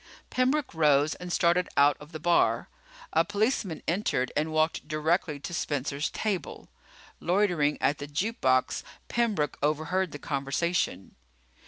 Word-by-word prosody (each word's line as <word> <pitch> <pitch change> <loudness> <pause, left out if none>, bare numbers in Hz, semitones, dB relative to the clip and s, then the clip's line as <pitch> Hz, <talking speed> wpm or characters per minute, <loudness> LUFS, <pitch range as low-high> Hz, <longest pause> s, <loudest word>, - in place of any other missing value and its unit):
Pembroke 260 +3 +1
rose 150 -2 +3
and 180 0 -8
started 175 +1 +2
out 145 0 +6
of 150 +2 -13
the 155 - -6
bar. 175 +2 +2 0.4
A 165 - +4
policeman 205 - -1
entered 165 -8 0
and 155 +1 0
walked 155 -1 0
directly 155 0 0
to 175 - -6
Spencer's 145 -2 -2
table. 205 -5 -3 0.5
Loitering 175 -5 +2
at 145 +2 +1
the 145 - -5
juke 190 +11 -2
box, 130 -1 +2 0.3
Pembroke 215 -11 0
overheard 155 +5 0
the - - -6
conversation. 140 - -1
160 Hz, 135 wpm, -28 LUFS, 145-185 Hz, 0.5 s, out